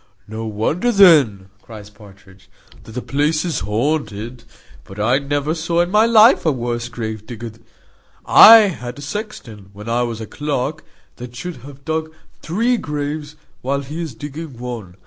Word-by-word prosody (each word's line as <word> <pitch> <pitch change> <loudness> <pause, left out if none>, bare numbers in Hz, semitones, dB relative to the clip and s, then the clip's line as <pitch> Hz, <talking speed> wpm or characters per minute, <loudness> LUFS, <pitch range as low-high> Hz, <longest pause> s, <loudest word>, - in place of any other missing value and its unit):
"No 110 +1 -6
wonder 130 - -1
then," 145 - +5
cries 105 -2 -12
Partridge, 100 -2 -18 0.4
"that 110 - -12
the 125 - -5
place 150 +4 0
is 170 - -2
haunted. 115 0 -3 0.4
But 95 +9 -12
I 120 +6 +2
never 145 +2 -2
saw 170 +1 0
in 175 +1 -1
my 215 +2 +4
life 230 +1 +6
a 160 - +2
worse 120 -2 -3
grave 110 -3 -6
digger. 115 -1 -7 0.7
I 225 0 +9
had 125 -7 -7
a - - -9
sexton, 135 - -7
when 105 +2 -11
I 120 +1 0
was 120 -2 -3
clerk, 150 +1 -3 0.3
that 125 0 -10
should 175 +6 -6
have 140 +2 -14
dug 160 0 -2 0.3
three 230 +9 0
graves 150 -3 -5 0.3
while 140 +2 -1
he 150 +5 -6
is 155 -8 -6
digging 145 +1 -8
one. 115 -7 -7
135 Hz, 160 wpm, -19 LUFS, 110-160 Hz, 0.7 s, I